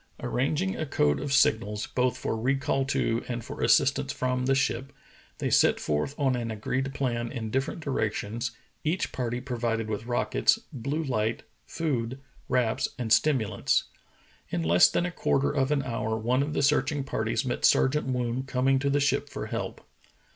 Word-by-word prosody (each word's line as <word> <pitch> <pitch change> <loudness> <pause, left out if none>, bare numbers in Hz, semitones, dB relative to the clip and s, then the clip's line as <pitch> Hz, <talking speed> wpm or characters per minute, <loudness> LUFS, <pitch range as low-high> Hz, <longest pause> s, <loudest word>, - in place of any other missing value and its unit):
Arranging 150 +9 0
a - - -2
code 75 - +2
of 145 0 -4
signals, 105 -5 +2
both 125 -1 0
for - - -2
recall 135 +3 0
to 115 -3 0
and 120 -2 -4
for - - -7
assistance 135 0 +3
from 125 0 -1
the 135 - +3
ship, 135 0 0 0.5
they - - -2
set - - +4
forth 75 - -1
on 135 -3 +2
an 120 -2 -3
agreed 130 +5 -2
plan 120 -3 -1
in 110 -4 -4
different 135 +6 -1
directions, 115 -3 -2 0.3
each 160 +4 -1
party 120 -1 -2
provided 120 -3 -2
with 105 +2 -4
rockets, 125 - +2 0.2
blue 140 +5 -2
light, 110 -5 -1 0.2
food, 130 -6 -2 0.3
wraps, 125 0 +1
and 115 -3 +1
stimulants. 110 -9 +2 0.7
In 85 - -1
less 85 +2 +6
than 175 - 0
a 180 - -2
quarter 140 -5 +1
of 135 -2 +1
an 145 -2 +1
hour 110 -3 -2
one 120 +4 +1
of 150 +2 -2
the - - 0
searching 145 0 +2
parties 135 - -1
met - - -3
Sergeant 140 +1 +3
Woon 125 -1 -1
coming 135 0 +1
to 140 +1 0
the 140 +1 +2
ship 140 0 +1
for - - -5
help. - - -5
130 Hz, 170 wpm, -27 LUFS, 115-140 Hz, 0.7 s, less